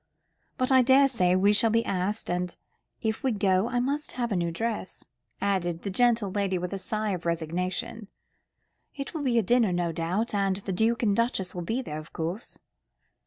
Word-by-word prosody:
But 255 +1 0
I 260 -1 +7
daresay 255 -8 +4
we 200 +3 +4
shall 225 +2 +4
be 230 +1 +2
asked, 195 +3 -1
and 180 0 -2 0.5
if 220 -1 -1
we 265 - +1
go 195 -1 +2
I 245 0 0
must 280 +4 -2
have 240 -2 -2
a - - +1
new 170 -1 0
dress," 215 +3 -4 0.4
added 175 -4 -1
the 200 - -3
gentle 230 -1 +2
lady 195 -2 0
with 180 +2 -4
a 195 - -3
sigh 215 +2 -2
of 180 -2 -3
resignation. 180 +6 -2 0.9
"It 275 +3 -6
will 315 - -3
be 250 -4 +1
a 230 - +4
dinner, 235 0 +3
no 175 -1 0
doubt; 175 +8 -1
and 195 -2 +1
the 195 0 -4
Duke 225 +5 +1
and 205 -3 +3
Duchess 230 -5 0
will 175 - -4
be 225 +9 -2
there, 150 -8 -5
of 155 - -12
course." 170 +7 -4
200 Hz, 195 wpm, -27 LUFS, 180-235 Hz, 0.9 s, I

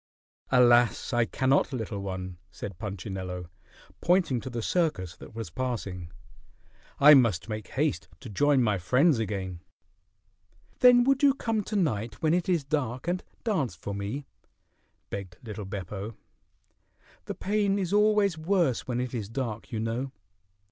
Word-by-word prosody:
"Alas! 120 0 +4
I 120 -1 +3
cannot, 135 +4 +1
little 110 -5 -4
one," 95 -2 -5
said 90 0 -8
Punchinello, 95 -4 -5 0.5
pointing 170 -9 +2
to 130 - -6
the 115 -2 -4
circus 130 - 0
that - - -13
was 115 -7 -6
passing. 100 -7 -4 0.9
"I 150 +2 +9
must 115 - +4
make 110 -2 -5
haste 150 +2 -1
to 130 - -9
join 135 +5 +3
my 105 -4 +1
friends 130 - +3
again." 95 -5 -3 1.2
"Then 245 -1 +7
would 270 +2 +2
you 280 -2 +5
come 225 -5 -1
to 215 - -4
night 115 - 0
when 155 0 +2
it 180 +1 0
is 170 -5 +2
dark 135 -1 -2
and 180 +1 -1 0.2
dance 185 - 0
for 100 - -6
me?" 100 +8 -4 0.9
begged 95 -3 -6
little 105 -3 -6
Beppo. 100 +2 -6 1.1
"The - - -5
pain 200 0 +1
is 190 -1 -2
always 210 -4 +3
worse 170 - +1
when 125 -1 -1
it 125 0 -3
is 110 -4 -4
dark, 115 -3 -4
you 115 - -2
know." 115 +4 -2
120 Hz, 150 wpm, -28 LUFS, 100-160 Hz, 1.2 s, I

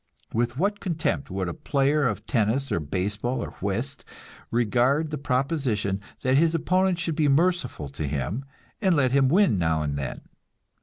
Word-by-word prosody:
With 120 +2 0
what 200 +5 0
contempt 160 -6 -1
would 95 -1 -2
a 85 - -3
player 140 - +1
of 105 - -3
tennis 120 +3 0
or - - +1
baseball 105 - -2
or - - -6
whist 115 +9 -2 0.5
regard 125 +7 +2
the 150 - -2
proposition 125 -8 0 0.2
that 130 +1 +3
his 165 +2 +3
opponent 185 +3 +2
should 165 -2 -2
be 155 -2 +2
merciful 165 - +1
to 70 +2 -4
him, 75 - -2 0.4
and 190 -4 +3
let 130 -4 +3
him 135 -1 +4
win 160 - +4
now 80 -2 +1
and 70 -1 -2
then! 70 - -4
130 Hz, 165 wpm, -26 LUFS, 100-155 Hz, 0.5 s, him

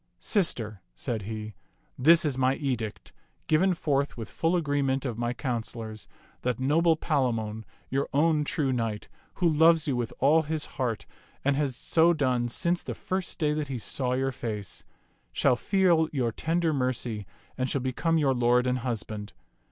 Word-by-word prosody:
Sister," 115 - 0
said 110 - -3
he, 110 +1 -6 0.2
" - - -30
this 170 -1 +7
is 145 -4 +1
my 130 +1 +2
edict, 120 -7 -4 0.3
given 180 +4 +3
forth 140 -4 0
with 115 -3 -7
full 165 +2 +1
agreement 140 -4 0
of 120 -4 -2
my 120 0 0
councilors, 115 -3 -4 0.3
that 125 0 -1
noble 160 +5 +3
Palamon, 115 -9 -1 0.3
your 135 +1 0
own 150 +1 +3
true 145 -2 0
knight, 115 -3 -2 0.3
who 180 - +2
loves 160 0 +5
you 140 - +1
with 120 -2 -2
all 150 +5 +4
his 155 -1 -3
heart 120 -7 -3 0.4
and 140 0 +3
has 140 -3 0
so 165 +6 +3
done 125 -5 +1
since 175 +8 0
the - - -5
first 185 0 -3
day 150 -4 +1
that 150 -1 -2
he 135 -2 -3
saw 125 +2 -1
your 135 +1 0
face, 105 -7 -5 0.5
shall 125 - +3
feel 170 - +2
your 125 -5 0
tender 165 +5 0
mercy 125 -6 -2 0.3
and 130 0 -1
shall 140 - +1
become 150 +6 0
your 140 -4 +3
lord 125 0 +3
and 125 0 +1
husband. 110 -3 -4
130 Hz, 165 wpm, -28 LUFS, 120-155 Hz, 0.5 s, this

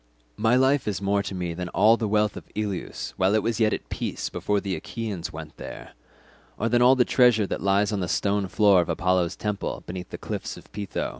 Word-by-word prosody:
My 110 +3 +3
life 130 +1 +3
is 105 - -1
more 100 0 +1
to 100 -1 -5
me 90 -2 -3
than 90 +1 -5
all 110 +6 +5
the 115 -2 -2
wealth 105 0 +1
of - - -8
Ilius 100 -4 -4
while 95 +3 +3
it 110 - +2
was 115 -1 -1
yet 110 -1 +3
at - - -4
peace - - -3
before 105 0 -1
the 100 -2 -3
Achaeans 105 -5 -5
went 80 -1 -9
there, - - -9 0.7
or 115 - 0
than 120 +1 +3
all 125 +2 +7
the 125 -2 +3
treasure 120 -5 +4
that - - -4
lies 100 +2 +2
on 105 - -1
the 90 - -2
stone 100 +3 0
floor 100 -2 +4
of 85 - -4
Apollo's 90 -1 +1
temple 105 -1 -3
beneath 90 0 -7
the - - -6
cliffs - - -5
of - - -15
Pytho. 100 0 -3
100 Hz, 225 wpm, -25 LUFS, 95-110 Hz, 0.7 s, all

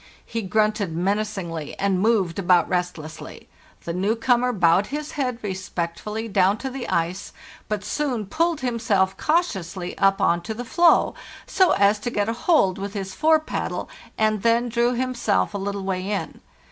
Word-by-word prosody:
He 230 - -3
grunted 210 -3 0
menacingly, 190 -5 -2
and 195 -2 +1
moved 200 -6 +1
about 180 -3 +4
restlessly. 175 -3 -4 0.4
The 170 - -4
new 195 +5 0
comer 245 +1 +2
bowed 185 -1 +3
his 295 +1 -5
head 250 -5 -2
_re 195 -3 -2
spectfully 190 +4 -4
down 195 -1 +3
to 265 +3 -5
the 255 -2 -5
ice, 170 +3 -1 0.4
but 210 -1 -2
soon 250 -2 -2
pulled 330 - 0
himself 225 -6 +1
cau 325 +3 +3
tiously 185 - -6
up 195 0 +3
on 170 0 +2
to 220 +6 -5
the 245 +2 -6
floe, 340 +7 +4 0.3
so 375 -2 +3
as 200 +1 +3
to 225 - -3
get 205 -3 -1
a 225 - 0
hold 230 - +2
with 200 +1 -5
his 190 -1 -4
fore 315 0 +4
paddle, 310 - -4 0.3
and 215 -1 +1
then 235 +2 +2
drew 235 +1 +1
himself 245 - 0
a 200 - -3
little 200 0 -3
way 190 0 -2
in. 205 -1 -4
205 Hz, 170 wpm, -23 LUFS, 185-240 Hz, 0.4 s, about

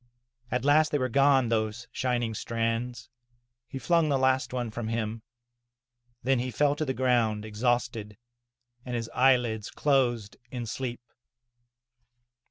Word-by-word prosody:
At 125 +1 -1
last 150 +1 +4
they 145 - +2
were 130 -2 -1
gone, 135 -1 +4
those 110 +2 -1
shining 120 -3 -1
strands 115 +2 -2 0.3
— 120 0 -48
^he 135 - -4
flung 165 +4 +2
the 140 - +2
last 130 0 +2
one 120 -3 -3
from 115 0 -4
him. 115 0 -3 1.0
Then 135 0 +2
he 125 +1 -2
fell 145 +3 +2
to 155 - -1
the 130 -2 -2
ground, 115 -5 +1
exhausted, 110 -1 -1 0.7
and 125 -2 -4
his 115 -1 -4
eyelids 125 -4 +2
closed 120 -7 0
in 120 -2 -5
sleep. 120 +1 -4
120 Hz, 140 wpm, -28 LUFS, 115-130 Hz, 1.0 s, last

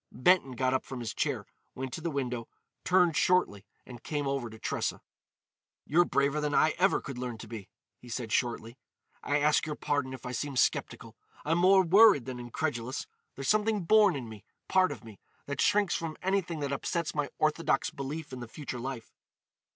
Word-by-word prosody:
Benton 170 -3 +3
got 130 +1 0
up 130 - 0
from 130 - -7
his 115 -2 -4
chair, - - -2 0.3
went 130 -1 -5
to - - -5
the 170 - -2
window, 125 -5 -3 0.4
turned 180 -3 +3
shortly 125 - +2 0.2
and 120 -2 -11
came 145 -2 -3
over 135 -3 -2
to 110 - -11
Tressa. - - -2 0.9
"You're 175 +4 +4
braver 140 +1 +1
than 150 -1 -1
I 155 - +4
ever 195 +2 +3
could 135 -3 -7
learn 125 -2 -4
to - - -10
be," 110 -3 -8 0.3
he 125 - -14
said 120 -2 -4
shortly. 120 +1 -1 0.4
"I 145 - 0
ask 150 +2 +2
your 150 - -3
pardon 145 -3 -1
if 130 - -13
I 125 - -4
seem 140 +3 -3
sceptical. - - 0 0.3
I'm 165 +3 +2
more 190 +1 +6
worried 195 - +6
than 130 -1 -6
incredulous. 120 0 -3 0.3
There's 135 -1 -5
something 215 -2 +2
born 205 0 +5
in 130 -4 -5
me—part 115 - -1
of - - -8
me—that 115 +6 -8
shrinks 205 -3 +3
from 165 -2 -3
anything 185 -4 -1
that 140 -1 -2
upsets 170 +4 -2
my 145 -1 -1
orthodox 155 +2 +1
belief 150 0 -6
in 130 - -6
the 120 - -7
future 125 0 -7
life. 130 -2 -6
140 Hz, 185 wpm, -30 LUFS, 125-165 Hz, 0.9 s, more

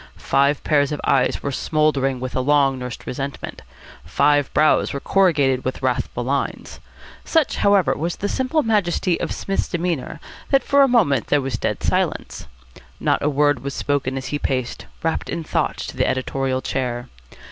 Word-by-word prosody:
Five 140 +1 +1
pairs 145 -2 +2
of 150 - -3
eyes 130 -2 +1
were 140 - -2
smouldering 140 -3 0
with 130 0 -5
a 130 - +1
long 135 -1 +2
nursed 125 -2 -7
resentment. 140 +2 -5 0.4
Five 145 - +2
brows 155 0 +3
were 140 - -3
corrugated 145 -9 +2
with 130 0 -4
wrathful 125 -1 -1
lines. 140 +3 -3 0.4
Such, 320 -4 +1
however, 200 -4 +3
was 170 +3 -2
the 205 - -3
simple 260 +7 0
majesty 185 -5 +1
of - - -3
Psmith's 195 - -2
demeanour 170 -5 -3 0.3
that 275 -1 +3
for 280 0 +4
a 275 - +6
moment 165 - +2
there 145 - +3
was 130 -4 -3
dead - - -2
silence. - - -1 0.5
Not - - +1
a 150 - +1
word 145 -2 +2
was 140 0 -4
spoken 135 -2 -1
as 130 -1 -5
he 145 - -2
paced, 130 -4 -3 0.2
wrapped 165 0 -1
in 170 - -3
thought, - - -1
to - - -6
the - - +1
editorial 130 0 -1
chair. 125 -2 -3
140 Hz, 170 wpm, -21 LUFS, 130-170 Hz, 0.5 s, a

